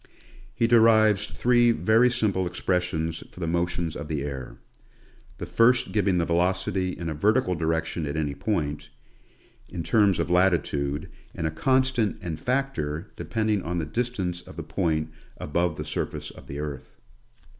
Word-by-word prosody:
He 115 - +2
derives 110 -3 +5
three 120 -1 +3
very 115 +2 +4
simple 100 -6 0
ex 90 +1 -7
pressions 85 -3 -1
for - - -13
the 85 - -2
motions 85 -1 -1
of 75 - -6
the 75 -3 -2
air; 70 -3 -6 0.8
the - - -5
first 115 -3 +3
giving 95 -2 +2
the 85 - +1
velocity 90 +2 0
in 85 - -5
a 80 - -2
vertical 105 - +2
direction 80 -1 -1
at 70 +2 -3
any 75 -2 -1
point, 75 -1 -2 0.8
in 85 -3 -4
terms 100 -4 +3
of - - -1
latitude, 75 -6 +1 0.3
and 80 - -3
a 80 - 0
constant 130 - +1
and 80 -3 -5
factor 85 - -2
depending 110 -2 -1
on 90 +1 -3
the 80 - -1
distance 95 -2 -2
of - - -14
the - - -4
point 80 -4 -1 0.3
above 85 +2 -1
the 75 - -4
surface 75 - -4
of - - -14
the 70 - -6
earth. 75 -3 -6
90 Hz, 160 wpm, -26 LUFS, 80-110 Hz, 0.8 s, derives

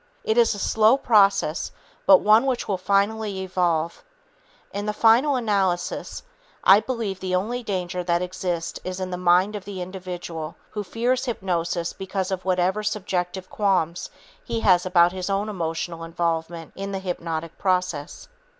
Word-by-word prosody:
It 220 - +1
is 235 -2 +4
a - - -6
slow 220 +4 +4
process 200 - +3 0.4
but 190 -1 +8
one 215 +5 +5
which 255 -2 -1
will 195 -3 -1
finally 200 +1 0
evolve. 175 - -1 0.7
In 205 +1 -3
the 210 - 0
final 245 +6 +5
analysis, 195 -7 -1 0.4
I 195 +2 +8
believe 220 -6 -3
the 185 -1 -1
only 230 +7 -1
danger 180 -4 -3
that 170 -1 +1
exists 180 -2 -3
is 185 0 -5
in 185 -1 -4
the - - -2
mind 180 +3 +3
of 205 - -5
the 195 -1 -7
individual 175 -3 -6 0.2
who 210 -1 -4
fears 245 +6 0
hypnosis 175 -7 -2
because 190 0 -3
of 185 -1 -3
whatever 185 +2 +1
subjective 190 -3 -2
qualms 185 -5 0 0.3
he 230 -1 -3
has 185 -3 +4
about 175 -1 +5
his 185 +1 -4
own 200 +2 0
emotional 165 -2 -3
involvement 165 -1 -3
in 195 +1 -5
the - - -1
hypnotic 165 -3 -4
process. 180 -6 -1
185 Hz, 155 wpm, -24 LUFS, 175-210 Hz, 0.7 s, but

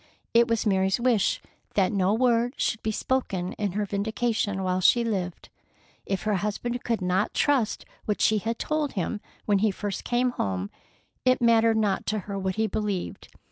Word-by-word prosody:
It 235 0 +5
was 230 -1 0
Mary's 190 0 +2
wish 235 -5 +2 0.3
that 195 -1 +3
no 195 -2 +2
word 240 +2 +2
should 225 - 0
be 220 - -1
spoken 200 -7 -1
in 205 -4 -2
her 210 +1 -1
vindication 205 0 -1
while 185 0 0
she 235 +6 +5
lived. 190 -6 -3 0.6
If 195 -2 -2
her 210 -2 +1
husband 235 +5 -3
could 230 -5 -1
not 185 +4 0
trust 265 -7 +1 0.2
what 210 - -1
she 215 -1 +3
had 225 +3 -2
told 305 -2 -1
him 205 +2 -2 0.2
when 205 -2 +3
he 215 +2 +3
first 200 0 -4
came 245 +1 +1
home, 95 - -2 0.5
it 255 0 +4
mattered 230 -1 +4
not 205 -3 0
to 215 +1 0
her 200 0 -5
what 190 -1 -2
he 220 - +1
believed. 210 -3 -3
210 Hz, 180 wpm, -26 LUFS, 195-235 Hz, 0.6 s, It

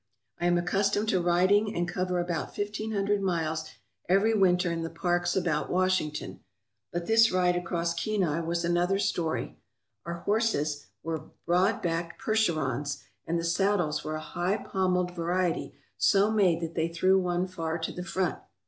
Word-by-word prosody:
I 175 - +1
am 175 0 +3
accustomed 200 +4 +1
to 185 - +2
riding 185 +5 +3
and 175 0 0
cover 180 0 -1
about 175 -2 -3
fifteen 210 +2 -3
hundred 200 0 +1
miles 160 -4 -1 0.4
every 200 +4 +4
winter 180 -4 +3
in 165 0 -2
the 165 - -3
parks 175 +1 0
about 165 -5 0
Washington. 180 - 0 0.5
But 175 0 -3
this 225 +2 +5
ride 180 -1 +2
across 170 -1 -1
Kenai 170 -3 0
was 170 +1 -1
another 175 +3 +2
story. 175 -5 -2 0.4
Our 170 0 -5
horses 170 -9 0 0.2
were 160 -1 -3 0.2
broad 180 +5 +2
backed 170 0 -2
Percherons, 150 - 0 0.2
and 170 - 0
the - - -3
saddles 170 -3 +1
were 155 0 -3
a 155 - -4
high 175 +5 -1
pommelled 180 -3 0
variety 175 0 -1 0.2
so 200 +2 +4
made 190 -7 +3
that 165 0 -4
they 160 - 0
threw 185 +3 +3
one 180 0 0
far 165 -3 -3
to 165 - -3
the 180 - -6
front. 185 -1 -1
175 Hz, 160 wpm, -28 LUFS, 165-195 Hz, 0.5 s, this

